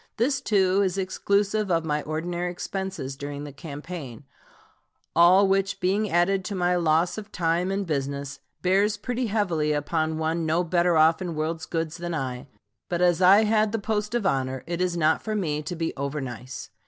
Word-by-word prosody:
This, 270 +4 +1
too, 195 -5 +2
is 190 -1 0
exclusive 200 +2 0
of 165 -2 +1
my 150 -1 0
ordinary 175 +4 -3
expenses 190 -6 -5
during 145 +1 -6
the 145 - -7
campaign, 145 -3 -8 0.9
all 180 +4 +6
which 195 0 +1
being 200 +4 +1
added 185 +3 +2
to 200 - -3
my 180 -1 +1
loss 170 +3 +2
of 210 0 -11
time 170 +1 0
and 195 +1 -1
business, 140 -3 -3 0.2
bears 200 +3 +2
pretty 245 +2 -2
heavily 175 -8 0
upon 155 +2 -1
one 160 +1 -1
no 160 +2 +1
better 175 0 +2
off 160 +2 +4
in 175 -3 -3
world's 160 +1 -3
goods 165 0 -3
than 175 -1 -4
I; 130 -2 -4 0.4
but 175 0 0
as 175 0 +3
I 195 +4 +7
had 215 0 +2
the - - +1
post 210 +1 -2
of 235 -4 0
honor, 130 -5 0
it 170 +1 -3
is 180 -1 0
not 160 -1 +2
for 215 -1 -3
me 155 -7 -1
to 175 +4 -5
be 165 0 -2
over 140 +2 -3
nice. 125 -1 -7
175 Hz, 185 wpm, -25 LUFS, 155-195 Hz, 0.9 s, I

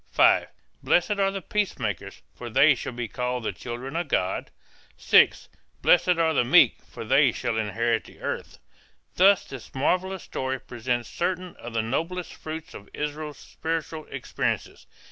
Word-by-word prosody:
(5) - - +4 0.3
Blessed 175 +4 +2
are 195 0 +3
the 195 -1 -5
peacemakers 110 - -3
for 120 - -8
they 140 +5 +6
shall 125 - -5
be 120 -1 -4
called 125 +2 -3
the - - -1
children 125 +4 -7
of 175 +1 -1
God. 90 +1 -1 0.5
(6) - - +4 0.4
Blessed 180 -1 +5
are 165 -1 +2
the 130 - +3
meek 120 - +6
for - - -8
they - - +5
shall 115 - -2
inherit 115 +1 0
the - - -16
earth. - - -5 0.6
Thus 195 +1 +5
this 135 -1 -10
marvelous 185 +7 0
story 130 0 -3
presents 120 -1 -3
certain 180 0 -3
of 120 0 -9
the 115 -1 0
noblest 165 +9 -3
fruits 160 0 -7
of 100 - -11
Israel's 150 -1 -4
spiritual 160 -1 -4
experiences. - - -3
135 Hz, 155 wpm, -26 LUFS, 120-170 Hz, 0.6 s, they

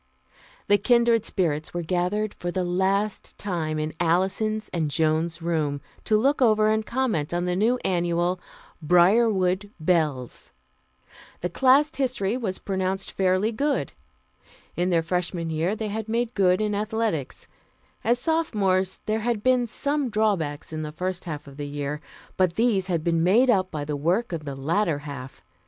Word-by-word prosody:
The 205 0 +4
"Kindred 235 0 +3
Spirits" 155 -4 -1
were 175 - -1
gathered 185 +5 -1
for 175 - -5
the 185 +1 -1
last 190 +3 -1
time 165 -6 -2
in 155 0 -2
Alison's 190 +6 +1
and 160 -4 -1
Joan's 160 +2 0
room, 155 -4 0 0.3
to 215 - +3
look 275 +6 +2
over 215 -3 +4
and 220 0 +1
comment 215 - -1
on 175 0 0
the 180 0 0
new 225 +6 +2
Annual, 175 0 +1 0.4
Briarwood 185 +3 +3
Bells. 155 -7 -1 0.9
The 175 - -2
class 270 +7 +4
history 245 -6 0
was 215 -7 -2
pronounced 190 0 -2
fairly 190 +3 +1
good. 275 - -1 0.8
In 175 +1 0
their 170 -2 +2
Freshman 170 -1 -2
year 165 +6 0
they 220 -1 -4
had 220 +1 -4
made 235 +1 0
good 185 0 +3
in 210 -1 0
athletics. 210 - -2 0.6
As 235 +3 +3
Sophomores, 210 - 0
there 215 +1 0
had 225 -1 -1
been 255 -2 +3
some 285 +3 -1
drawbacks 190 -10 -1
in 155 - -3
the 150 -1 -5
first 185 +3 -4
half 150 -3 -5
of 140 0 -13
the 145 -1 -4
year, 145 +1 -4 0.4
but 185 -2 +2
these 220 -5 +2
had 170 -4 -1
been 165 -1 +1
made 225 +9 +5
up 185 -4 +2
by 150 -3 -4
the 150 0 -2
work 175 +9 0
of 155 -2 -4
the 140 -2 -5
latter 160 +4 0
half. 140 - -9
185 Hz, 160 wpm, -25 LUFS, 165-215 Hz, 0.9 s, made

